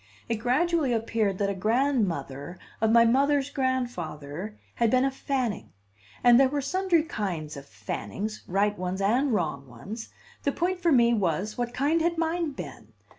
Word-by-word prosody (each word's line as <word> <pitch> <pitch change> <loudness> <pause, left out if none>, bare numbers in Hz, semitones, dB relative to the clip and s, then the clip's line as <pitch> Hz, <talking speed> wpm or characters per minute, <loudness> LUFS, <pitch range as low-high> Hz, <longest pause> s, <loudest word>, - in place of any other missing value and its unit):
It 230 - -1
gradually 280 +5 +1
appeared 220 -3 0
that 200 0 0
a - - -2
grandmother 190 - 0 0.2
of 220 - +3
my 230 +1 +6
mother's 280 +3 +2
grandfather 210 - -3 0.2
had 235 -1 +2
been 255 +3 +3
a 270 - +1
Fanning, 260 -6 -3 0.5
and 245 0 +7
there 270 -1 +5
were 290 +1 -1
sundry 340 +3 +1
kinds 180 - -4
of 140 0 -10
Fannings, 110 - -5
right 205 +3 +1
ones 185 +1 -2
and 245 +8 +2
wrong 150 - -1
ones; 200 - -8 0.3
the 280 - +1
point 360 +5 -1
for 340 -2 +2
me 235 -3 +5
was, 195 0 0
what 240 -1 -2
kind 295 +6 +2
had 340 +1 +1
mine 330 -1 0
been? - - -9
230 Hz, 165 wpm, -27 LUFS, 190-275 Hz, 0.5 s, and